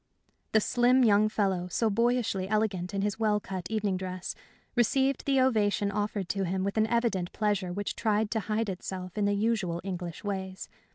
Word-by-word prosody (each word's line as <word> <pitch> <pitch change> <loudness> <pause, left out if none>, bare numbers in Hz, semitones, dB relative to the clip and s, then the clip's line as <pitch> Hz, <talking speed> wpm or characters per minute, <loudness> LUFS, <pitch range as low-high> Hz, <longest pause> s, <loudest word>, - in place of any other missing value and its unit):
The 220 - +5
slim, 250 +3 +4
young 215 -1 +5
fellow, 195 -4 0
so 225 +5 0
boyishly 230 -4 +1
elegant 200 -4 0
in 195 0 -1
his 210 +2 -1
well 210 -2 +2
cut 190 -3 -6
evening 210 -3 0
dress, 185 -1 -4 0.4
received 265 +3 +2
the 270 -1 +3
ovation 210 -5 +2
offered 205 -2 -2
to 195 0 0
him 190 +1 -1
with 200 +1 -2
an 220 0 +3
evident 225 -6 0
pleasure 205 -4 0
which 205 +2 -3
tried 215 -1 +1
to 225 - +1
hide 220 +1 -1
itself 185 -1 -6
in 210 -1 +1
the 205 0 +2
usual 205 -5 0
English 180 -3 -5
ways. 190 -2 -4
205 Hz, 180 wpm, -29 LUFS, 190-220 Hz, 0.4 s, The